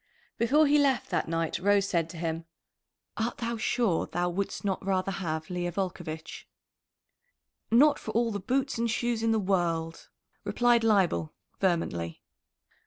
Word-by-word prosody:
Before 285 Hz, +7 st, +4 dB
he 295 Hz, +1 st, +4 dB
left 270 Hz, -6 st, +1 dB
that -, -, 0 dB
night 165 Hz, 0 st, -1 dB
Rose 200 Hz, +1 st, +3 dB
said 170 Hz, -4 st, 0 dB
to 170 Hz, -, -9 dB
him: 165 Hz, 0 st, -3 dB, 0.7 s
"Art 230 Hz, +2 st, -2 dB
thou 235 Hz, 0 st, -2 dB
sure 215 Hz, -5 st, +1 dB
thou 175 Hz, +1 st, -1 dB
wouldst 200 Hz, +3 st, -3 dB
not 195 Hz, -1 st, -1 dB
rather 190 Hz, 0 st, 0 dB
have 165 Hz, -4 st, -4 dB
Leah 175 Hz, -1 st, -2 dB
Volcovitch?" 175 Hz, -4 st, -5 dB, 1.2 s
"Not 285 Hz, +6 st, +5 dB
for -, -, -8 dB
all 230 Hz, 0 st, +2 dB
the 205 Hz, -, -3 dB
boots 265 Hz, +5 st, -1 dB
and 235 Hz, 0 st, +1 dB
shoes 235 Hz, 0 st, 0 dB
in 225 Hz, 0 st, +2 dB
the 225 Hz, -, +3 dB
world," 170 Hz, -5 st, -1 dB, 0.3 s
replied 240 Hz, -1 st, +3 dB
Leibel 195 Hz, -7 st, +2 dB, 0.2 s
vehemently. 125 Hz, -, -1 dB
195 Hz, 150 wpm, -28 LUFS, 170-230 Hz, 1.2 s, Not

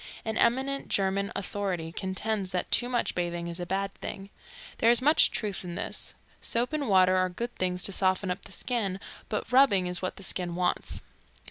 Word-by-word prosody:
An 220 Hz, -1 st, -2 dB
eminent 265 Hz, +4 st, +1 dB
German 195 Hz, 0 st, 0 dB
authority 190 Hz, -4 st, -3 dB
contends 190 Hz, +2 st, -2 dB
that 180 Hz, -1 st, -2 dB
too 245 Hz, -, +3 dB
much 245 Hz, -1 st, 0 dB
bathing 175 Hz, -1 st, -2 dB
is 170 Hz, +1 st, -5 dB
a 175 Hz, -, -4 dB
bad 195 Hz, +1 st, -1 dB
thing. 195 Hz, +1 st, -7 dB, 0.5 s
There 230 Hz, -, +5 dB
is 235 Hz, -, +5 dB
much 300 Hz, +5 st, +5 dB
truth 205 Hz, -3 st, -3 dB
in 175 Hz, -1 st, -6 dB
this. -, -, -5 dB, 0.3 s
Soap 240 Hz, +5 st, 0 dB
and 290 Hz, -5 st, -1 dB
water 185 Hz, -1 st, +5 dB
are 185 Hz, 0 st, +2 dB
good 235 Hz, +7 st, -5 dB
things 180 Hz, 0 st, -1 dB
to -, -, +3 dB
soften 185 Hz, 0 st, +1 dB
up 180 Hz, -, -5 dB
the -, -, -12 dB
skin, 200 Hz, -3 st, -1 dB, 0.3 s
but 215 Hz, +2 st, -3 dB
rubbing 250 Hz, -8 st, +5 dB
is 180 Hz, 0 st, +1 dB
what 185 Hz, -, -2 dB
the 195 Hz, -, -8 dB
skin 180 Hz, -2 st, 0 dB
wants. 180 Hz, 0 st, -1 dB
195 Hz, 195 wpm, -28 LUFS, 180-230 Hz, 0.5 s, There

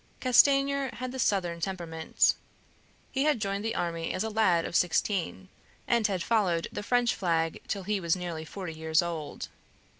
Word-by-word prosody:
Castanier 275 Hz, +2 st, +4 dB
had 255 Hz, 0 st, -5 dB
the 260 Hz, -, -6 dB
southern 180 Hz, -7 st, 0 dB
temperament; 165 Hz, -4 st, 0 dB, 0.8 s
he 270 Hz, +2 st, 0 dB
had 300 Hz, -5 st, +2 dB
joined 200 Hz, 0 st, -2 dB
the 225 Hz, -, -2 dB
army 165 Hz, -1 st, -2 dB
as 185 Hz, -, -1 dB
a 220 Hz, -, -3 dB
lad 185 Hz, -6 st, +3 dB
of -, -, -5 dB
sixteen, 185 Hz, +2 st, 0 dB, 0.4 s
and 235 Hz, -3 st, +3 dB
had 190 Hz, -4 st, -2 dB
followed 190 Hz, -8 st, +1 dB
the -, -, -4 dB
French 245 Hz, +2 st, +2 dB
flag 165 Hz, -3 st, -1 dB
till 195 Hz, -, -3 dB
he 205 Hz, +1 st, -1 dB
was 170 Hz, -1 st, +1 dB
nearly 175 Hz, -3 st, -5 dB
forty 180 Hz, +1 st, -7 dB
years 160 Hz, +2 st, +1 dB
old. 165 Hz, -3 st, -5 dB
190 Hz, 170 wpm, -28 LUFS, 170-225 Hz, 0.8 s, Castanier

